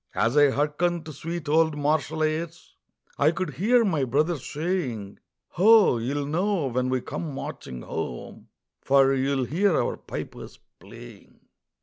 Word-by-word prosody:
As 115 +4 +1
I 145 -1 +6
hearkened 150 +5 -1
to 155 - -8
sweet 165 +2 -6
old 160 0 +2
martial 155 +1 0
airs 160 +2 -3 0.5
I 145 - +5
could 185 +3 -3
hear 230 +5 +3
my 160 -8 0
brother 150 +7 +1
saying: 135 - -4 0.3
"Ho! 205 - +5
you'll 140 +5 -2
know 175 +3 0
when 125 +1 0
we 130 -1 0
come 155 +1 -5
marching 65 - -7
home, - - -6 0.3
For 135 0 +4
you'll 135 0 0
hear 180 +6 +1
our - - -1
pipers - - -8 0.2
playing." - - -14
150 Hz, 140 wpm, -25 LUFS, 135-170 Hz, 0.5 s, I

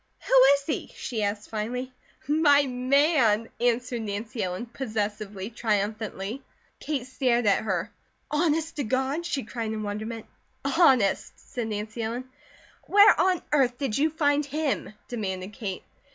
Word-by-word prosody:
"Who - - -2 0.2
is 280 - -4
he?" 310 - -3
she 225 -3 -4
asked 205 +1 -2
finally. 250 +4 -3 0.3
"My 290 -1 +5
man!" 255 -3 +2
answered 245 0 0
Nancy 220 +3 -4
Ellen, 185 +4 -3
possessively, 215 -4 -4
triumphantly. 215 +1 -2 0.4
Kate 285 -5 -3
stared 250 -2 +1
at 200 - +4
her. 185 -5 -1 0.4
"Honest 320 +1 0
to 285 - 0
God?" 265 +8 -1
she 280 -5 -2
cried 220 0 -4
in 215 -1 -4
wonderment. 215 +2 -5 0.4
"Honest!" 270 - +3
said 240 -3 -6
Nancy 215 +2 -4
Ellen. 235 +3 -3 0.6
"Where 410 +1 +7
on 370 -2 +2
earth 260 -4 +3
did 265 -6 -2
you 305 +3 +3
find 295 -2 +2
him?" 290 -3 -2 0.2
demanded 195 -4 -4
Kate. 195 -3 -5
240 Hz, 140 wpm, -26 LUFS, 215-280 Hz, 0.6 s, Where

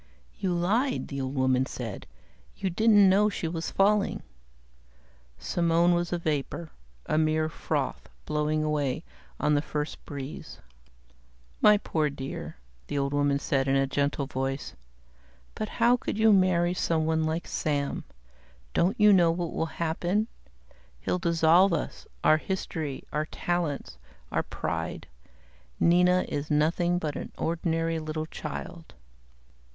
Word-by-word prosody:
"You 190 -3 0
lied," 220 +10 0
the 140 -1 -3
old 130 +1 -3
woman 130 0 +2
said. 115 -6 -6 0.5
"You 190 - -2
didn't 205 +1 +5
know 200 +3 +4
she 180 -4 -3
was 165 0 -3
falling." 200 +1 +2 1.1
Simone 170 0 +2
was 175 0 0
a 175 - +1
vapor, 155 0 -3 0.3
a 155 - +1
mere 155 0 +2
froth 150 -3 -3 0.2
blowing 150 0 0
away 150 -1 -1 0.4
on 150 - +2
the 145 - +3
first 150 0 -4
breeze. 140 -1 -7 1.0
"My 210 0 +7
poor 155 -6 0
dear," 135 - -6 0.3
the 145 - -3
old 140 0 0
woman 145 -1 +2
said 135 -1 0
in 135 - +3
a 135 0 +3
gentle 140 +1 0
voice. 135 +1 -3 0.8
"But 215 - -4
how 240 +1 +3
could 220 - -4
you 220 -1 +5
marry 180 -2 +3
someone 160 -2 +1
like 160 +2 -2
Sam? 145 -3 -1 0.7
Don't 180 +5 +1
you 210 -1 +7
know 175 -3 +5
what 170 0 -2
will 165 - -1
happen? 175 +5 0 0.7
He'll 180 - -1
dissolve 170 +1 +4
us, - - -4 0.2
our 155 - +6
history, 160 -5 -4
our 150 +1 -1
talents, 170 -6 -3 0.3
our - - +1
pride. - - -4 0.7
Nina 180 +1 +4
is 145 +1 -3
nothing 165 +4 +2
but 155 -4 -3
an - - -6
ordinary 165 0 -1
little 155 0 -3
child." 160 +2 -7
160 Hz, 135 wpm, -28 LUFS, 145-175 Hz, 1.1 s, My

